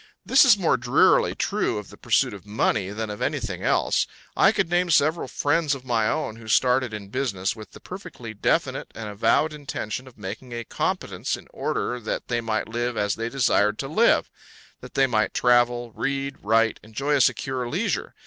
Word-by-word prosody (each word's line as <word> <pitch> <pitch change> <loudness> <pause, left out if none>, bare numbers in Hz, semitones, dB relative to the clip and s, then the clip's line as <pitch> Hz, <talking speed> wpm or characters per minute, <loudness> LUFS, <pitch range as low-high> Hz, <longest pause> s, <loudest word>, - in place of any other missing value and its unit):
This 265 +1 +6
is 235 -6 +7
more 175 -8 +2
drearily 120 0 +3
true - - -1
of 105 - -7
the - - -12
pursuit - - +1
of 100 - -10
money 105 -1 0
than 110 +1 -4
of 105 - -8
anything - - -2
else. - - +1 0.3
I - - +5
could - - 0
name 175 +1 +1
several 155 -1 +3
friends 145 +3 +1
of 130 -1 -11
my 115 -3 +1
own 110 0 -2
who 115 -1 -12
started 125 +2 +3
in 105 -2 -7
business 105 -7 -1
with 110 -2 -12
the - - -12
perfectly 175 - -9
definite 105 - 0
and 110 -1 -6
avowed 115 +9 +1
intention 135 -5 -5
of 125 - -15
making 110 +5 -7
a 120 0 -4
competence - - -2
in - - -15
order 125 - -2
that 110 - -4
they 120 -1 0
might 110 -1 -2
live 120 +1 -2
as 105 0 +1
they 115 +1 -3
desired 110 -5 +2
to 135 - -4
live; 220 +11 +3 0.5
that - - -12
they 135 - +4
might 110 -5 0
travel, 120 -1 +3
read, 140 +3 -3
write, 115 +1 +2
enjoy 135 +7 -2
a 140 - +4
secure 130 -1 0
leisure. 180 - -2
120 Hz, 190 wpm, -24 LUFS, 110-140 Hz, 0.5 s, is